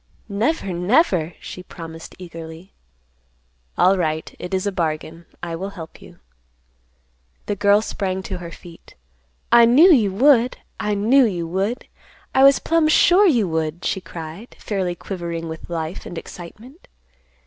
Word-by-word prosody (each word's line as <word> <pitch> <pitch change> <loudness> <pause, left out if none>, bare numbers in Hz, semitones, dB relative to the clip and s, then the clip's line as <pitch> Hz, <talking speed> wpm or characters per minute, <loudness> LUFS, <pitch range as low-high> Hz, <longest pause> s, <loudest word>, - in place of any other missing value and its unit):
"Never, 210 - -1
never," 180 - +2
she 180 - -9
promised 165 -2 -10
eagerly. 165 0 -10 1.0
"Alright, 165 -4 +1
it 180 - -7
is 190 0 -1
a 200 - 0
bargain. 165 -1 -3 0.2
I 170 -1 -3
will 190 +4 -5
help 165 -5 -11
you." - - -15 1.3
The 205 - -2
girl 205 +1 +3
sprang 190 -3 -3
to 190 -2 -5
her 170 -1 -7
feet. 170 0 -14 0.6
"I 235 0 +8
knew 290 +11 +7
you 215 -8 +3
would. 250 +2 +4 0.2
I 210 0 -1
knew 240 +7 +4
you 175 -6 -2
would. 195 +7 -2 0.5
I 265 - +4
was 275 0 +7
plumb 330 -1 +1
sure 360 +5 +5
you 235 - +3
would," 160 +1 -2
she 190 - -1
cried, 170 +7 -9
fairly 190 -4 -2
quivering 170 -3 -5
with 160 +1 -8
life 165 0 -4
and 175 - -8
excitement. 220 - -11
190 Hz, 145 wpm, -21 LUFS, 170-230 Hz, 1.3 s, I